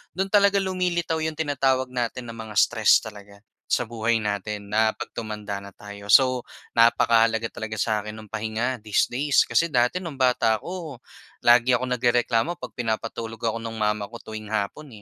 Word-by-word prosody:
do'n 190 +2 -1
talaga 200 -1 +4
lumilitaw 180 -3 -1
'yon 160 0 -2
tinatawag 135 -4 0
natin 120 0 -3
na - - -10
mga 110 -1 -8
stress - - +4
talaga 100 -2 -11 0.3
sa - - +1
buhay 115 -1 -1
natin 105 0 -4
na 110 0 +2
'pag - - -7
tumanda 105 -2 -5
na 100 -1 -12
tayo. 100 0 -11
So 130 +4 +5 0.3
napakahalaga 115 -1 +3
talaga 110 -1 -6
sa 110 0 0
akin 105 +1 -7
no'ng 110 -2 -12
pahinga 110 +3 -2
these 105 +1 0
days. 140 +3 +3
Kasi 170 - +1
dati 125 +3 +1
no'ng 165 -6 -7
bata 125 -4 +2
ako 165 -1 -7 0.4
lagi 120 +1 +5
akong 125 +1 -2
nagrereklamo 120 +5 +1
'pag - - -9
pinapatulog 115 0 -3
ako 115 0 0
no'ng 115 0 -6
mama 105 -1 -1
ko 115 +3 -11
tuwing 110 -1 -8
hapon, 110 +8 -3
115 Hz, 170 wpm, -24 LUFS, 110-130 Hz, 0.4 s, So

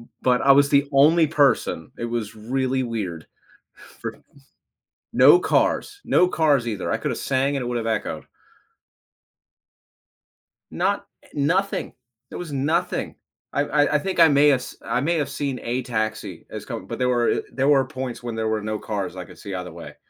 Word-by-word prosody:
M 115 - -16
But 125 -1 +3
I 135 0 +6
was 140 0 +4
the 140 0 +4
only 155 +4 +5
person, 145 -2 +1
it 120 - -3
was 110 -1 -4
really 130 +4 -1
weird 95 -9 -4 0.8
for - - -3 1.0
No 360 - +7
cars 415 0 0
no 180 - +4
cars 150 -7 +2
either. 105 -4 -3
I - - +2
coulda - - -2
sang 135 +1 0
and 135 - -2
it - - -3
would 120 -1 -1
have 115 - -3
echoed. - - -7 2.5
Not - - 0 0.2
eh, - - -20
nothing. 180 +8 0 0.4
There - - -7
was 175 -4 -6
nothing. 155 +6 -1 0.4
I - - +1
I 145 +1 +1
I - - +4
think 190 +2 -3
I 165 - +9
may 145 0 +5
have 135 -3 +3
s - - -9
I 120 +2 -1
may 165 +5 +1
have 145 - -1
seen 140 -3 -3
a 125 +2 -1
taxi 110 -3 -3
is - - -7
coming, - - -6
but - - -6
there 125 0 +2
were 120 -1 +1
there 135 +3 +1
were 140 -2 +4
points 130 -2 -6
when 120 -2 -4
there 110 0 -1
were 110 -1 0
no 110 0 -3
cars 100 -3 -4
I 90 -1 -6
could - - -15
see 100 -2 -8
either 90 -1 -5
way. 85 +1 -10
130 Hz, 190 wpm, -23 LUFS, 115-145 Hz, 2.5 s, I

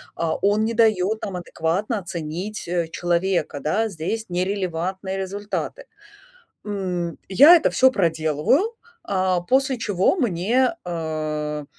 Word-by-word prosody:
а, 165 -1 -1
он 205 +2 +2
не 230 - -1
дает 220 -2 +2
нам 190 -3 -4
адекватно 180 +6 -2
оценить, 175 +3 -5
э, 170 -1 -1
человека, 175 -4 -1
да, 215 +9 0
здесь 195 +6 -4
нерелевантные 185 0 -2
результаты. 205 - -4 0.8
М, 180 -5 -3
я 285 - +8
это - - +1
всё 260 0 +5
проделываю, 165 - +1 0.3
а, 185 -2 0
после 265 +6 +1
чего 205 - +1
мне, 245 - +1
э, 155 -3 -3
185 Hz, 115 wpm, -23 LUFS, 170-215 Hz, 0.8 s, я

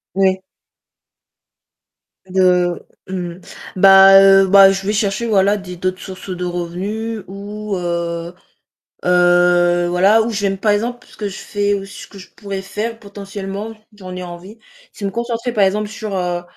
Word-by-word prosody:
Ouais. 190 -1 +2 1.9
De 180 -2 +1 0.2
mmh, 175 -2 -5 0.4
bah, 195 0 +8
heu, 195 0 +6
bah, 195 0 +7
je 195 0 -4
vais 205 - 0
chercher 210 +2 -1
voilà 205 -1 +2
des 185 -2 -9
d'autres 185 +1 -3
sources 190 +1 -9
de 180 -1 -4
revenus 190 +6 -4
ou, 205 +1 -6
heu 170 -1 -3 0.7
heu, 175 0 +3
voilà, 190 +5 +4
ou 230 - -3
je 215 -2 -3
vais 200 - +1
me 195 - -3
par 210 +2 +1
exemple 240 +4 -3
ce - - -18
que 210 - -4
je 190 - -9
fais 205 0 -1
ou 195 -1 -4
ce 200 - -11
que 200 - -14
je 185 - -13
pourrais 200 -2 -6
faire 215 +4 -5
potentiellement 200 0 -7 0.2
j'en 185 -2 -9
ai 180 - -6
envie, 180 +5 -11 0.3
c'est 205 - -9
me 195 - -1
concentrer 235 +2 -3
par 210 - +1
exemple 210 +2 0
sur, 215 -1 -6
heu, 175 -1 -2
195 Hz, 165 wpm, -18 LUFS, 180-205 Hz, 1.9 s, bah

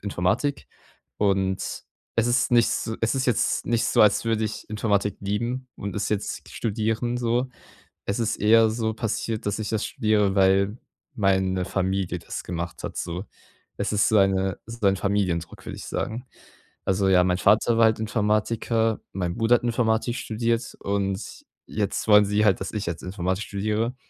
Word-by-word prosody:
Informatik 100 +9 -1 0.5
und 95 -2 +1 0.6
es 115 +1 +3
ist 120 0 +2
nicht 120 -1 +6
s 110 0 -2
es 115 +3 +1
ist 130 - 0
jetzt 120 -5 +1
nicht 120 0 +1
so, - - +4
als 105 +1 +4
würde 110 -1 +1
ich 110 0 -5
Informatik 105 -1 0
lieben 120 +6 -2
und 100 0 -6
es 105 - -1
jetzt 105 -1 -3
studieren, 115 +2 -1
so. 120 +1 0 0.6
Es 100 - -1
ist 115 -1 0
eher 110 +1 +5
so 110 -1 -1
passiert, 110 0 -3
dass 105 +1 -1
ich 105 - -3
das 110 -2 -1
studiere, 105 -3 +1
weil 95 +3 +3 0.4
meine 95 -2 +1
Familie 95 -2 -1
das 85 - -6
gemacht 85 0 -5
hat, - - -5
so. 90 +3 -4 0.5
Es - - -1
ist 105 0 +3
so 110 - +3
eine 95 -1 +2
ist 115 0 -9
ein 95 0 +4
Familiendruck, 95 -4 -1
würde - - -6
ich - - -8
sagen. 120 +4 -4 0.6
Also 95 0 +2
ja, 90 -1 +5
mein 90 0 +2
Vater 110 +4 +4
war 115 - +6
halt 110 0 +4
Informatiker, 110 +1 0
mein 90 -2 -2
Bruder 115 +1 +4
hat - - -6
Informatik 115 0 +1
studiert 115 +1 -2
und 100 0 -3 0.2
jetzt 105 +1 -2
wollen 105 -1 +7
sie 105 +1 +1
halt, 95 -3 +3
dass - - -4
ich 105 -2 -3
jetzt 85 -1 -4
Informatik 95 +1 -2
studiere. 110 +4 -1
105 Hz, 170 wpm, -25 LUFS, 95-115 Hz, 0.6 s, wollen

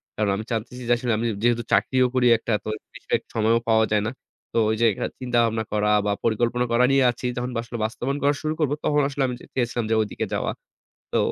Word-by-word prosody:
কারণ 105 -1 0
আমি 105 - -4
জানতেছি 120 +3 -4
যে 120 - +6
আসলে 120 0 -2
আমি 115 +2 -1 0.2
যেহেতু 120 0 +2
চাকরিও 130 -1 +3
করি 125 -1 +3
একটা 115 - -5
তো - - -5 0.3
বিশেষ - - -1 0.2
সময়ও 115 +1 +3
পাওয়া 110 0 +5
যায় 105 - +2
না। - - -2 0.4
তো - - -1
ওইযে 110 +1 +3 0.2
আ - - +1
চিন্তা-ভাবনা 115 -3 +1
করা 105 0 +1 0.2
বা 105 - +1
পরিকল্পনা 120 +2 +1
করা 120 +2 +4
নিয়ে 135 -1 +4
আছি। 120 - -9
তখন 125 +1 -2
বা - - 0
আসলে 120 0 -7
বাস্তবায়ন 125 +5 -2
করা 145 +1 +4
শুরু 155 0 -1
করব 150 -3 +1
তখন 150 0 +3
আসলে 140 -1 -1
আমি 125 - -3 0.2
চেয়েছিলাম 120 -2 0
যে 110 - +3
ওইদিকে 105 -3 -3
যাওয়া। - - -1 0.6
তো - - +3
120 Hz, 215 wpm, -24 LUFS, 110-125 Hz, 0.6 s, যে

